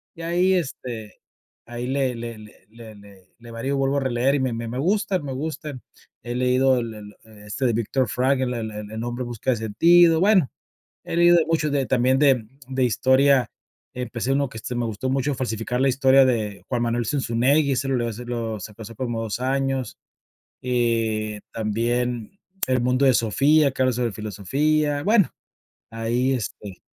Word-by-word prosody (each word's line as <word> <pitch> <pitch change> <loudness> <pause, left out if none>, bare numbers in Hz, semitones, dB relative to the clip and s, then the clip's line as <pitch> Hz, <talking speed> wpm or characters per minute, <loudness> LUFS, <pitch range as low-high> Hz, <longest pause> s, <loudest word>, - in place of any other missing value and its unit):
Y 165 - -10
ahí, 180 +3 +2
este, 125 - -4 0.5
ahí 120 +1 -6
le 135 -2 0
le 115 -1 -6
le 105 -2 -16
le 110 -1 -12
le 100 -2 -18
le 120 0 -13
varío, 115 +4 -4
y - - +1
le 135 - -1
vuelvo 135 +1 +1
a - - +3
releer 130 +1 +1
y - - 0
me 130 -2 -1
me 115 0 -4
me 120 - -5
gusta, 195 +3 +1
me 140 -4 -6
gustan, 150 -1 -5 0.4
he 120 0 -5
leído 130 +1 +3
el 115 -2 -5
el 105 -1 -11
e 105 -2 -16
este 130 +6 -2
de 120 - +2
Viktor 120 +3 0
Frankl, 130 +1 +1
el 110 -2 -4
el 105 0 -8
El 110 +1 -5
Hombre 120 +1 -3
En - - -6
Busca 120 +2 -4
de 120 - 0
Sentido, 165 +10 +4
bueno, 190 - +4 0.5
he - - -5
leído 175 0 +6
de 160 - +3
muchos 160 -2 0
de 140 -2 +1
también 130 +1 +2
de 135 -6 +3 0.2
de 130 -1 0
historia, 130 +1 +3 0.4
empecé 125 +1 -2
uno 140 -1 0
que 110 - -10
este 125 +3 -5
me 120 0 -1
gustó 115 +3 -3
mucho, 135 +2 0
Falsificar 125 0 -3
la 135 - +3
historia 135 +1 +5
de 110 -5 -1
Juan 120 -2 -1
Manuel 120 0 -1
Zunzunegui, 140 +3 +1
ese 135 +2 -1
lo 120 -3 0
eso 115 +2 -7
lo 115 -3 -3
sacó 105 +3 -10
hace 115 +2 -10
como 120 -1 -3
2 110 +1 -4
años, 135 0 -1 0.6
y 115 -4 0
también 115 +1 -1 0.4
El 130 -1 +1
Mundo 125 +2 +2
de 130 - +5
Sofía, 140 +7 +3
que 130 - -4
habla 130 -1 +2
sobre 120 -2 -1
filosofía, 145 +9 0
bueno, 205 -2 +4 0.6
ahí, 120 +3 0
este, 105 -5 -6
125 Hz, 190 wpm, -23 LUFS, 115-135 Hz, 0.6 s, leído